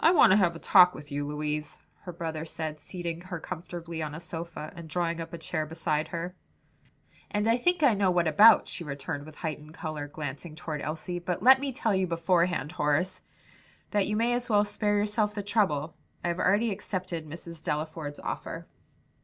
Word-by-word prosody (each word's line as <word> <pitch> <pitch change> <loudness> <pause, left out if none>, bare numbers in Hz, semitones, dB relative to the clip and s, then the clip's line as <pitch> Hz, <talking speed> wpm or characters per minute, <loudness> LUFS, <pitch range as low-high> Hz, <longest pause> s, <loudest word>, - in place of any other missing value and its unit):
"I 320 - +8
want 335 - +7
to - - +7
have 175 -4 +3
a - - -5
talk 180 +1 +6
with 145 0 -10
you, 145 0 -2
Louise," 150 0 -3 0.3
her 180 - -5
brother 160 -2 -4
said, 155 -1 -5
seating 170 -1 -5
her 180 -1 -6
comfortably 170 0 -6
on 150 -1 -4
a - - -6
sofa 170 -2 -6
and 170 -2 -9
drawing 170 0 -1
up 165 0 -7
a 170 - -5
chair 160 -1 -2
beside 155 -1 -1
her. 170 +1 -4 1.0
"And 210 +1 0
I 230 - +5
think 350 +5 +1
I 265 -5 +6
know 200 -2 +2
what 175 -2 +2
about," 205 +9 +7
she - - -4
returned 145 0 -5
with 155 - -11
heightened 155 -1 -5
color, 155 -4 -4
glancing 145 +2 -6
toward 155 -3 -5
Elsie, 165 +3 -4
"but 175 +1 -3
let 265 +2 +8
me 275 0 -2
tell 235 -5 0
you 190 -1 +2
beforehand, 170 -1 +1
Horace, 180 +3 0 0.7
that 205 -2 +2
you 210 - 0
may 235 +2 +2
as 245 0 -2
well 205 -2 +5
spare 205 0 0
yourself 210 0 +1
the 205 - -3
trouble. 165 -8 +1 0.3
I 175 - 0
have 170 +1 -2
already 210 +4 +3
accepted 185 -5 -4
Mrs. 165 +1 -9
Delaford's 155 -1 -3
offer." - - -5
170 Hz, 195 wpm, -28 LUFS, 155-195 Hz, 1.0 s, I